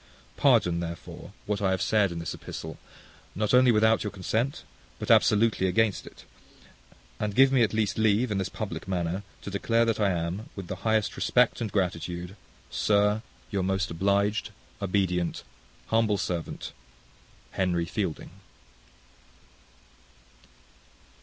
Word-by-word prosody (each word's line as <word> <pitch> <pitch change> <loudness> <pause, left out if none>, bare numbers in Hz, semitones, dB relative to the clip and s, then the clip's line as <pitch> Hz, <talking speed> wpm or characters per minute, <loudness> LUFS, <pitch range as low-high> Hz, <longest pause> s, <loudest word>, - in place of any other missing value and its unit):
Pardon, 85 -1 +3
therefore, 85 -1 -7
what 105 -1 -2
I 95 - +2
have 95 0 +1
said 105 -4 +2
in 85 - -5
this 85 -1 -4
epistle, - - -8 0.6
not 105 +3 0
only 125 0 +6
without 110 0 +3
your 105 - -2
consent, 110 +7 -2 0.3
but - - -1
absolutely 105 -3 +4
against 110 +2 +1
it; - - -14 0.9
and 105 -1 -2
give 135 +2 +6
me 130 -2 +4
at 110 - +3
least 110 -2 0
leave, 110 +2 +2
in 100 - 0
this 95 0 -2
public 105 -2 -6
manner, 90 0 -1 0.2
to 100 - -6
declare 115 +4 +2
that 115 -1 0
I 105 -2 +3
am, 90 +4 -3
with 100 - -6
the 95 +1 -5
highest 110 +2 0
respect 125 -1 +2
and 110 -3 -2
gratitude, 90 -1 -2 0.4
Sir, 105 +1 +2 0.3
Your 100 - 0
most 95 0 -1
obliged, 100 +4 +1 0.3
Obedient, 90 -3 0 0.5
humble 110 -2 +2
servant, 90 -3 -4 0.8
HENRY 90 -3 0
FIELDING. 95 -4 -3
100 Hz, 135 wpm, -27 LUFS, 90-110 Hz, 0.9 s, only